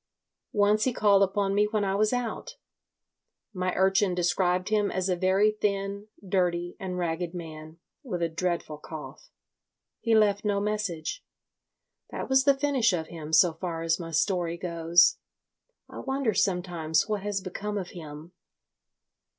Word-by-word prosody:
Once 210 +1 +3
he 255 - +1
called 200 -3 +4
upon 195 0 +1
me 205 +1 +3
when 210 -2 0
I 195 - 0
was 210 +2 +2
out. 245 - -3 1.0
My 185 -1 -1
urchin 190 0 +2
described 180 +1 +1
him 210 -1 +2
as 185 0 -2
a 180 - +2
very 190 +4 +3
thin, 200 -1 -2 0.2
dirty, 175 -2 0
and 185 -2 -4
ragged 175 0 -2
man, 160 -1 -8 0.2
with 185 - -3
a - - +2
dreadful 165 -2 -3
cough. 160 - -10 0.7
He 230 -2 +2
left 205 -2 +3
no 205 -1 +1
message. 210 - -3 0.9
That - - -5
was 265 0 +4
the 280 -1 +4
finish 270 -7 +2
of 160 -3 -3
him 160 -2 -8
so 175 0 +5
far 165 0 -4
as 165 +1 +1
my 165 -1 -6
story 170 0 0
goes. 170 -1 +3 0.7
I - - -9
wonder 265 -4 -1
sometimes 175 -4 0
what 210 -2 -1
has 205 0 -2
become 200 +2 -5
of 185 -3 -4
him. 155 -1 -10
190 Hz, 150 wpm, -27 LUFS, 170-210 Hz, 1.0 s, so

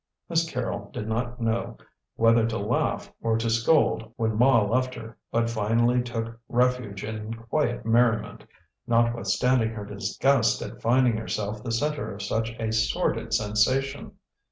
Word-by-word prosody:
Miss 165 -1 +1
Carrol 120 -6 -4
did 105 - -5
not 120 +2 -2
know 115 0 -1 0.4
whether 115 0 +4
to 115 0 -2
laugh 110 +3 -1
or 115 -1 +1
to 115 0 -1
scold 115 -2 +2
when 110 -1 -1
Ma 125 +2 +5
left 125 +5 0
her, 115 0 -9 0.2
but 115 0 +1
finally 115 +2 +2
took 115 -1 -5
refuge 125 -5 0
in 110 +1 -5
quiet 120 +2 -2
merriment, 115 0 +2 0.4
notwithstanding 115 +1 +2
her 110 -2 -6
disgust 110 +2 +1
at - - -9
finding 120 -1 +3
herself 105 -1 -4
the 120 - -3
centre 150 +5 -1
of 100 - -7
such 110 +3 -1
a 110 -1 -1
sordid 110 +1 0
sensation. 120 +6 0
115 Hz, 145 wpm, -26 LUFS, 110-125 Hz, 0.4 s, Ma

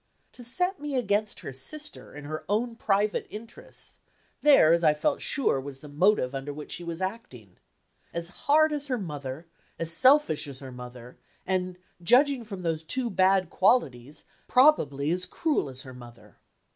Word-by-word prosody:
To 245 - -12
set 360 +11 0
me 295 -1 -4
against 210 -3 0
her 135 - -7
sister, 300 - -3
in 150 0 -9
her 155 +1 -5
own 230 +3 0
private 205 -1 0
interests 230 - -10 0.4
there, 270 - +6
as 170 0 +2
I 155 -2 +5
felt 290 - 0
sure, 235 - 0
was 135 0 -8
the 150 - -13
motive 145 -2 +2
under 135 +1 -4
which 150 +1 -8
she 175 - -4
was 170 +1 -6
acting. 130 - -7 0.5
As 170 0 -4 0.2
hard 310 +1 +5
as 290 -1 -2
her 255 -2 -1
mother, 145 - -6 0.3
as 165 0 0
selfish 260 - +4
as 140 -2 -8
her 130 -1 -9
mother, 125 0 -11 0.3
and, 185 -1 -2 0.2
judging 255 - +4
from 195 -5 -8
those 165 -2 -1
two 240 +9 -2
bad 190 -1 +2
qualities, 145 - +1 0.2
probably 155 - +3
as 180 +1 -1
cruel 295 - -1
as 130 0 -6
her 130 - -10
mother. 120 -1 -14
180 Hz, 170 wpm, -27 LUFS, -, 0.5 s, there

